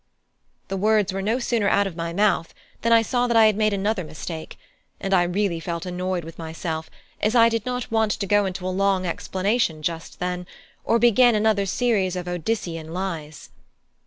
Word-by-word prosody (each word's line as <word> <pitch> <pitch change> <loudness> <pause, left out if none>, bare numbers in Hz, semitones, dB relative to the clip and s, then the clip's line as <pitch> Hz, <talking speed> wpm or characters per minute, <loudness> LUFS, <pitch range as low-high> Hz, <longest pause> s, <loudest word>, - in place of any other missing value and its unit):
The 195 - -2
words 210 -1 +2
were 195 - -2
no 220 +5 0
sooner 235 -5 +1
out 200 - +3
of 190 -4 -5
my 165 0 -3
mouth 195 -2 +1 0.3
than 230 - +1
I 230 -1 +6
saw 245 +1 0
that 235 -1 +2
I 225 - +7
had 215 -1 +4
made 215 0 +2
another 200 0 -1
mistake; 155 +1 -7 0.4
and 195 0 -2
I 175 -2 +4
felt 175 +1 -4
really 195 -5 0 0.3
annoyed 180 -1 -2
with 165 +2 -11
myself, 160 0 -5 0.3
as 215 +3 +1
I 230 -1 +7
did 230 0 -2
not 250 -2 -3
want 220 -2 +2
to 200 - -3
go 205 0 +3
into 185 0 -5
a - - 0
long 195 -1 +1
explanation 185 -1 -1
just 165 +1 -4
then, 180 0 -3 0.4
or 230 - +2
begin 240 0 +5
another 210 -2 +2
series 200 -5 +1
of 180 -1 -4
Odyssean 170 -3 -3
lies. 165 -5 -5
195 Hz, 190 wpm, -23 LUFS, 175-220 Hz, 0.4 s, I